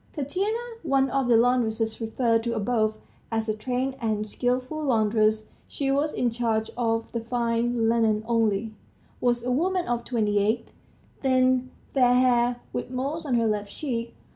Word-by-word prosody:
Tatiana, 370 - -1 0.2
one 270 -3 +1
of 270 -2 +1
the 235 -2 +5
laundresses 230 -2 +1
referred 225 0 +1
to 235 0 -2
above 215 0 +1 0.4
(as 225 0 -1
a 215 - +1
trained 255 +4 -2
and 215 -2 -1
skilful 255 +7 -2
laundress 215 -3 +2 0.2
she 275 -1 -2
was 290 +3 +1
in 245 -1 +1
charge 225 -2 -1
of 225 -1 -1
the 235 - -2
fine 235 0 0
linen 225 -2 +2
only), 225 -2 +1 0.5
was 240 -1 +1
a 250 - 0
woman 360 +7 +1
of 240 -1 -1
twenty 210 -4 +1
eight, 220 +3 0 0.5
thin, 255 -1 +2 0.2
fair 250 -2 +4
haired, 245 -1 +3 0.2
with - - -3
moles 280 +5 -3
on 255 - +1
her 230 -1 +2
left 210 -2 -1
cheek. 235 -5 -4
240 Hz, 160 wpm, -26 LUFS, 225-255 Hz, 0.5 s, the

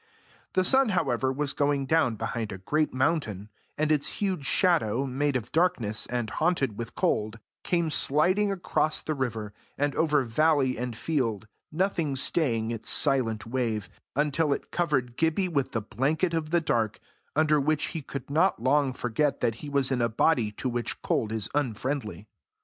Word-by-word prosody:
The 185 - +3
sun, 265 +5 +4
however, 135 - +1
was 140 +1 -2
going 145 -1 +1
down 135 -6 +2
behind 110 +1 -3
a 95 - -5
great 150 +11 0
mountain, 130 - -1 0.3
and 155 0 +1
its 150 -2 +2
huge 185 -9 -1
shadow, 140 - +2
made 140 +2 -1
of 120 -3 -3
darkness, 155 - 0
and 120 -2 -2
haunted 135 - 0
with 115 +1 -7
cold, 110 +1 0 0.3
came 170 -3 0
sliding 185 +9 +3
across 175 -4 0
the 155 - -2
river, 115 -7 -3 0.2
and 145 0 0
over 150 -3 +2
valley 135 +1 +2
and 120 -1 -4
field, 115 -9 -1 0.2
nothing 165 -4 0
staying 120 -5 +1
its 115 -1 -4
silent 125 -7 +2
wave, 115 -4 -2 0.2
until 150 +1 +1
it - - -6
covered 135 -8 0
Gibbie 165 +4 +1
with 140 -6 -1
the 115 - -1
blanket 145 - 0
of 160 -2 -1
the 170 +1 +2
dark, 115 -8 0 0.4
under 155 0 +3
which 150 +1 0
he 160 - -5
could 135 -2 -7
not 165 +2 +2
long 135 +2 +2
forget 125 +4 0
that 115 - +2
he 150 - -6
was 140 -2 +1
in 125 -2 +1
a 115 - +2
body 115 -1 +2
to 130 - -4
which 120 -1 -3
cold 110 - 0
is 110 -2 -2
unfriendly. 130 -4 -2
140 Hz, 170 wpm, -27 LUFS, 115-155 Hz, 0.4 s, sun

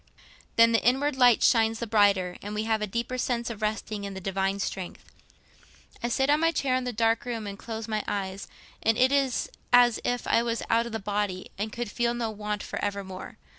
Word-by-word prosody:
Then 230 0 +6
the 230 - +2
inward 270 +4 +2
light 245 -3 +5
shines 225 -2 +4
the 235 - -3
brighter, 200 -5 +3
and 205 +1 -6
we 215 - -1
have 220 -1 0
a 210 - -1
deeper 235 +4 -3
sense 235 -2 -1
of 220 -2 -8
resting 215 -1 -2
on 200 -1 -5
the - - -5
Divine 195 +1 -1
strength. 190 -2 -5 0.9
I 240 - -1
sit 265 +3 +1
on 295 +1 +4
my 330 +1 +3
chair 270 -5 0
in 255 0 -1
the 250 - -1
dark 225 0 +1
room 230 -3 -4
and 200 - -5
close 225 +1 -6
my 215 -1 -1
eyes, 195 -1 -3 0.3
and 225 0 +2
it 255 +1 +4
is 275 -3 +1 0.2
as 245 -2 +6
if 245 -1 -1
I - - +3
was 235 -1 -2
out 230 +1 +3
of - - -8
the 225 - -2
body 205 -2 -3
and 210 +2 -3
could 235 -2 -4
feel 240 +1 0
no 230 -2 -2
want 210 0 -4
for - - -5
evermore. 200 -2 -5
225 Hz, 220 wpm, -27 LUFS, 205-240 Hz, 0.9 s, Then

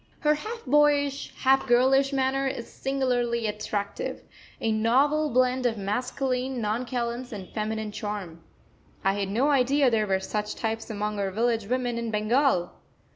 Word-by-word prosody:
Her 300 -1 +4
half 440 +8 -6
boyish, 285 0 +2
half 270 0 +3
girlish 265 +3 +4
manner 270 0 +1
is 240 -3 -4
singularly 245 -4 -1
attractive 210 -1 -3 0.4
a 225 - 0
novel 275 +8 +2
blend 255 0 +2
of 225 -2 -2
masculine 250 +5 -2
nonchalance 235 +2 -2
and 195 -4 -7
feminine 215 0 -3
charm. 205 -6 -5 0.6
I 195 - +3
had 200 -1 -2
no 255 +9 +2
idea 275 0 +3
there 215 -2 +1
were 190 -1 +1
such 210 +2 -3
types 225 0 -3
among 210 -1 -3
our 195 -1 0
village 225 +1 0
women 245 -1 -1
in 235 -1 -3
Bengal. 215 -3 +2
240 Hz, 145 wpm, -26 LUFS, 215-270 Hz, 0.6 s, Her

